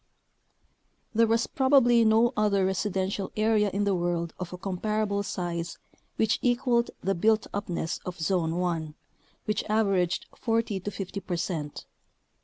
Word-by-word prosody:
c. - - -45 1.1
There 230 +1 +4
was 230 +1 +2
probably 260 -4 +4
no 225 +3 +4
other 200 -2 +2
residential 190 0 -1
area 215 -1 +3
in 200 +2 -1
the 200 -1 +2
world 175 -2 -1
of 180 -2 -5
a 180 - -6
comparable 200 +2 -1
size 170 -3 -4 0.4
which 220 -1 +1
equaled 240 -1 +2
the 195 - +1
built 215 +4 +2
upness 180 -5 -3
of 180 -1 -6
Zone 165 -1 0
1, 165 -4 -2 0.5
which 210 - 0
aver 215 -2 +2
aged 180 -1 0
40 225 -3 0
to 190 - -4
50 195 -1 -5
percent. 170 -5 -4
200 Hz, 145 wpm, -27 LUFS, 180-220 Hz, 1.1 s, There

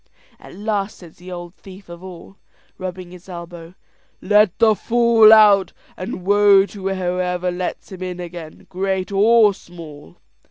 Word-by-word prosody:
At - - -14
last 205 0 -3
says 170 -3 -16
the 180 +1 -12
ould 175 -1 -8
thief 190 0 -15
of 170 +1 -12
all, 190 +1 -12 0.4
rubbing 185 -1 -7
his 180 +1 -15
elbow, 170 -1 -10 0.4
"Let 210 -1 +2
the 220 -1 +4
fool 230 0 +4
out; 210 -3 +5 0.2
and 185 -1 -7
woe 200 -1 +4
to 200 -1 -8
whoever 180 -1 -2
lets 180 +2 -6
him 185 -1 -10
in 180 -1 -6
again, 170 -3 -10
great 190 +1 -3
or 210 +1 +4
small." 155 - -14
185 Hz, 150 wpm, -19 LUFS, 175-205 Hz, 0.4 s, out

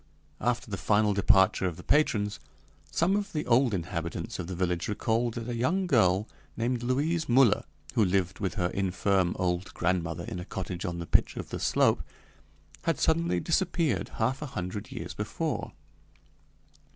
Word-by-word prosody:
After 120 -2 -1
the 100 - -2
final 105 0 +3
departure 95 -1 +4
of 85 -3 -4
the 90 - -10
patrons, 105 -9 +2 0.5
some 180 +4 +2
of 205 -1 -2
the 150 -1 -2
old 125 +1 +4
inhabitants 85 -3 -4
of - - -4
the 95 - -4
village 90 -1 -1
recalled 115 +2 0
that 115 0 -5
a 120 - -2
young 170 +11 +1
girl 105 - +3 0.3
named 120 +1 0
Louise 150 +7 0
Müller, 120 -3 +4 0.3
who 110 - +3
lived 95 -2 0
with 100 0 -2
her 90 -4 0
infirm 95 -1 +1
old 90 0 -1
grandmother 85 -2 -1
in 90 - -5
a - - -5
cottage 90 0 -5
on 85 -2 -3
the 85 - -4
pitch - - +2
of - - -5
the - - -4
slope, - - +3 0.8
had 165 - +1
suddenly 165 +1 +2
disappeared 170 -2 0
half 130 +5 0
a 150 - -3
hundred 95 -3 -5
years - - -6
before. - - -3
105 Hz, 165 wpm, -28 LUFS, 90-130 Hz, 0.8 s, departure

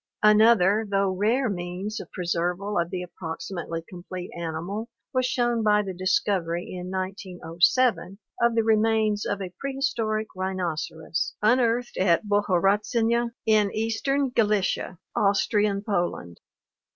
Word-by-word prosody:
Another 210 -1 +5
though 195 -1 +2
rare 220 +8 +1
means 190 +3 -4
of - - -9
preserval 180 +3 -1
of 170 - -4
the 180 0 -4
approximately 170 -1 -6
complete 180 0 -8
animal 170 +7 -4 0.2
was 255 -1 +2
shown 240 -2 +1
by 210 -1 +3
the 190 -2 -5
discovery 180 -2 0
in 180 0 -6
1907 190 +3 0 0.2
of 235 -1 +3
the 225 - +3
remains 220 -1 +2
of 200 - -2
a 180 -1 -7
prehistoric 230 -6 -1
rhinoceros, 170 -3 -3
unearthed 240 +1 +2
at 185 +1 +3
Bohorodczany 205 +4 +2 0.2
in 215 -2 +4
eastern 260 +5 0
Galicia, 210 -5 0 0.2
Austrian 200 0 +2
Poland. 175 - -2
200 Hz, 115 wpm, -25 LUFS, 180-225 Hz, 0.2 s, Another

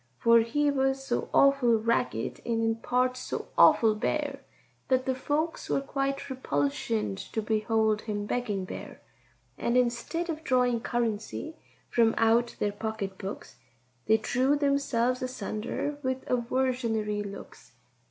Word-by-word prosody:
For 230 - +5
he 285 +6 +1
was 270 -1 0
so - - -2
awful 275 -4 +5
ragged, 230 +2 -1
and 230 -1 -1
in 225 0 +1
parts 255 +2 0
so - - -5
awful 220 -2 +6
bare, 280 +5 -2 0.5
That 255 -1 +2
the 260 - +1
folks 295 +5 -2
were - - +2
quite 275 0 -2
repulsioned 140 - -1
to - - 0
behold 220 0 +1
him 205 -2 -3
begging 210 -5 -2
there; - - -8 0.6
And 235 +1 +1
instead 250 +8 0
of 320 -1 -4
drawing 250 -3 +2
currency 235 +6 -2 0.4
from 230 -1 +3
out 230 +1 +3
their 205 - 0
pocket 205 -2 -5
books, 195 +2 -7 0.5
They 220 0 +5
drew 255 +5 +1
themselves 275 -4 +1
asunder 255 +3 -3
with 260 -1 -2
aversionary 235 -4 0
looks. 200 -1 -10
240 Hz, 135 wpm, -28 LUFS, 220-265 Hz, 0.6 s, awful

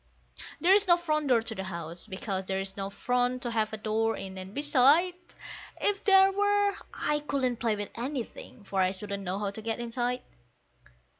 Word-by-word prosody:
There's 390 +4 +5
no 345 -1 +6
front 305 -4 -1
door 240 -4 +4
to 225 - -4
the 190 -3 -5
house, 170 -2 -6
because 190 0 -3
there's 195 0 -2
no 195 -1 -3
front 250 +4 0
to 240 - -2
have 220 -2 0
a 220 - -4
door 220 +1 0
in, 195 -1 -6
and 190 0 -7
beside, 290 - +4 0.7
If 410 0 0
there 385 -1 +7
were, 410 0 +2 0.2
I 300 0 -1
couldn't 270 -4 -1
play 230 -2 0
with 205 -1 -5
anything, 250 -2 -6
for 195 -1 -1
I 185 - +3
shouldn't 200 +1 -4
know 185 0 -3
how 205 -1 -2
to 220 - -8
get 225 +1 -2
inside. 240 +1 -2
230 Hz, 180 wpm, -29 LUFS, 200-295 Hz, 0.7 s, there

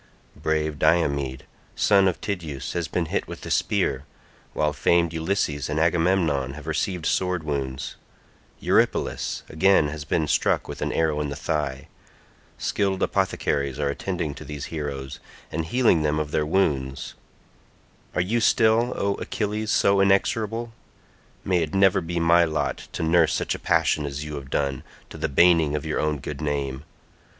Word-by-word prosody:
Brave 80 -1 -1
Diomed 70 -5 +1 0.3
son 100 -2 +4
of 90 - -1
Tydeus 80 -9 -4
has 85 -2 -2
been 90 - -1
hit - - 0
with - - -8
a - - -5
spear, 65 +1 +1 0.5
while 75 -1 +1
famed 85 +3 +2
Ulysses 80 -4 -1
and 75 +1 -1
Agamemnon 80 -5 +1
have 75 0 -10
received 80 +1 -2
sword 90 -3 0
wounds; 70 -3 -4 0.6
Eurypylus - - 0
again 80 -1 +3
has 75 0 -6
been 80 0 0
struck - - +1
with - - -7
an - - -1
arrow 80 -2 +1
in 75 - -2
the 70 - -4
thigh; 70 -3 -3 0.7
skilled 95 -2 0
apothecaries 70 -2 0
are 75 -1 0
attending 80 0 -3
to 75 - -10
these 75 -1 -6
heroes, 70 -4 -5 0.3
and 80 0 -2
healing 115 -4 +3
them 75 0 +1
of 75 -1 -2
their 75 -1 0
wounds; 70 -7 0 1.0
are 90 - +2
you 110 +7 0
still, 115 +2 +3
O 100 0 +1
Achilles, 105 0 -2
so 100 -2 +3
inexorable? 110 +4 +1 0.7
May 90 -2 +2
it 80 +2 -3
never 95 -1 +4
be 85 +1 -3
my 85 +1 +5
lot 80 -2 -2
to - - -3
nurse 80 -1 +3
such - - -1
a - - -6
passion 75 -2 +1
as 70 +1 -5
you 75 0 -7
have 70 -3 -7
done, 70 -2 -1 0.3
to - - -8
the 80 - -1
baning 80 0 +4
of 75 - -3
your 80 - -1
own 75 -1 0
good 70 +1 -6
name. 70 -2 -2
80 Hz, 160 wpm, -24 LUFS, 75-90 Hz, 1.0 s, my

